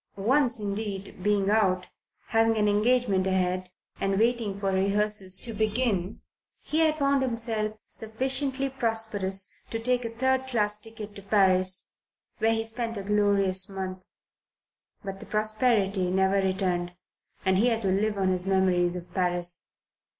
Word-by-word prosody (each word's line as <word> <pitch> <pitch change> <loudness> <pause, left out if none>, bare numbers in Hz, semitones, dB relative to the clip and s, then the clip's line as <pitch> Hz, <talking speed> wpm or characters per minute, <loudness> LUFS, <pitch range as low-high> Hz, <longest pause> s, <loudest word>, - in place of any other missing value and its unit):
Once 240 +4 +2
indeed, 200 -2 -5
being 205 0 +1
out, 190 -4 +2
but 185 - -18 0.4
having 225 0 +2
an 210 -1 +2
engagement 210 -2 +2
ahead, 185 -1 -1 0.3
and 195 0 0
waiting 225 -2 0
for 195 -1 -1
rehearsals 195 0 0
to 230 +3 -3
begin, 215 -2 -1 0.4
he 310 - -1
had 315 -1 +3
found 280 -2 +1
himself 225 -4 -1 0.2
sufficiently 265 +4 +1
prosperous 225 -7 +1 0.2
to 225 - -3
take 250 +2 0
a 230 - -3
third 260 +3 0
class 210 -5 +2
ticket 220 -1 -9
to 200 - -10
Paris, 185 -2 +3 0.5
where 225 0 +2
he 225 0 0
spent 230 0 -2
a 200 - -5
glorious 200 -2 +1
month. 185 -1 -6 1.0
But 195 -1 -6
the - - -10
prosperity 215 -3 +1
never 190 +1 +2
returned, 185 -2 -1 0.5
and 190 0 +3
he 235 - +3
had 230 -2 0
to 195 - +1
live 205 +2 0
on 190 -1 +1
his 180 -1 -1
memories 185 -2 +1
of 180 -1 -9
Paris. 175 -2 -1
205 Hz, 150 wpm, -26 LUFS, 190-225 Hz, 1.0 s, had